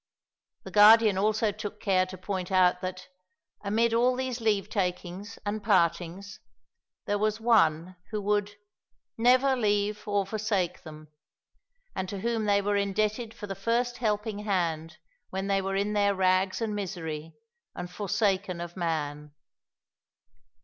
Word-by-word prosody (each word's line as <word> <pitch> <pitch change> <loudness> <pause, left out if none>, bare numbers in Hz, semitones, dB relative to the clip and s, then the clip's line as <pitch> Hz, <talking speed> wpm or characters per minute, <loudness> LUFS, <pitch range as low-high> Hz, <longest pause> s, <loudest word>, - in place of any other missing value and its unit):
The - - -9
Guardian 215 0 +7
also 215 +2 +1
took 205 +1 -7
care 185 -3 +2
to 185 0 -9
point 185 0 -4
out 180 -1 +3
that, 185 0 -5 0.6
amid 225 +3 +1
all 245 +2 +3
these 255 -2 -3
leave 205 -3 +1
takings 185 0 -3
and 205 +1 -3
partings, 185 +1 0 0.7
there 205 0 0
was 215 +1 0
One 185 -7 +2
who 215 - -3
would 205 0 0 0.6
"never 255 +3 +4
leave 210 -2 0
nor 205 -1 +1
forsake" 200 -4 -2
them, 155 -1 -12 0.9
and 185 - -3
to 195 -1 -5
whom 230 -1 -1
they 200 -1 +2
were 205 0 +1
indebted 215 +3 -1
for 205 - -7
the 195 - -5
first 235 +5 -1
helping 210 -2 -1
hand, 170 -6 -2 0.3
when 190 +1 -3
they 195 0 +1
were 195 0 -2
in 200 +2 0
their 200 -1 +2
rags 185 +2 +1
and 215 -2 -2
misery, 165 -6 -5 0.4
and 180 - -5
forsaken 195 -1 -1
of 175 0 -7
man. 150 -4 -3
200 Hz, 140 wpm, -28 LUFS, 185-215 Hz, 0.9 s, Guardian